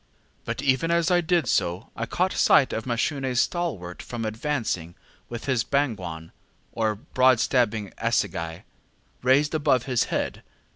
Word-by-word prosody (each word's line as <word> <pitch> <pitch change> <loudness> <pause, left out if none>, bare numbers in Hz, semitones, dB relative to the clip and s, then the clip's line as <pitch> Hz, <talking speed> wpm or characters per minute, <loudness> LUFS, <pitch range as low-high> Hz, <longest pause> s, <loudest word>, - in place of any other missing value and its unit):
But - - -4
even 135 +4 +2
as 170 +1 +2
I 175 0 +4
did 175 0 +1
so, 90 -1 0
I - - -3
caught - - 0
sight - - +4
of 110 - -3
MashuneŌĆÖs 130 +1 -1
stalwart 120 - -1
form 120 -2 -5
advancing 110 - -2 0.3
with 120 -1 -6
his 130 -4 +1
ŌĆśbangwan, 140 -4 +1
ŌĆÖ 80 -4 -8 0.4
or 110 -2 0
broad 130 +1 +3
stabbing 110 -5 +1
assegai, 85 0 -1 0.6
raised 135 +4 +3
above 145 -5 +2
his 125 -3 +1
head. - - -2
125 Hz, 145 wpm, -25 LUFS, 105-145 Hz, 0.6 s, I